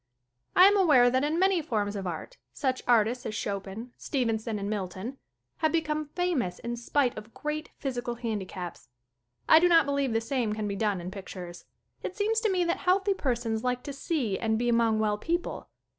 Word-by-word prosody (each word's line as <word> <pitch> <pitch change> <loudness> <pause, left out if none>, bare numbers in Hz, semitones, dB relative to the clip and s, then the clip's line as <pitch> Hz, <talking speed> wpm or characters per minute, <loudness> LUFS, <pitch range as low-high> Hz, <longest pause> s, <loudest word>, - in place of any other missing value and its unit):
I 365 - +9
am 405 +1 +6
aware 275 -10 +6
that 260 +2 +2
in 305 +3 0
many 380 -1 +3
forms 210 -8 -1
of 195 -2 -3
art 180 - -6 0.2
such 260 -3 -1
artists 240 +1 +3
as 215 - -4
Chopin, 205 +3 -4
Stevenson 225 -5 -1
and 200 0 -3
Milton, 205 +5 -4 0.4
have 315 - +1
become 310 -2 0
famous 320 - 0
in 235 0 -4
spite 245 +2 +1
of 215 +2 -10
great 300 +1 -4
physical 245 -3 -3
hand 225 -3 -3
icaps. 185 -2 -7 0.6
I 315 - +8
do 355 - +5
not 330 -4 +6
believe 280 -2 0
the 225 - +3
same 230 -2 -1
can 215 -1 -3
be 200 - -2
done 205 -3 0
in 180 +2 -6
pictures. 185 -3 -8 0.4
It 370 - -5
seems 435 +2 +2
to 450 -1 +1
me 370 -2 +2
that 340 0 0
healthy 385 +2 +2
persons 235 - -1
like 250 0 -1
to 285 - -5
see 275 - -1
and 220 -1 +1
be 240 +1 0
among 230 -2 +3
well 210 -1 +1
people. 345 +8 -3
245 Hz, 195 wpm, -28 LUFS, 215-305 Hz, 0.6 s, I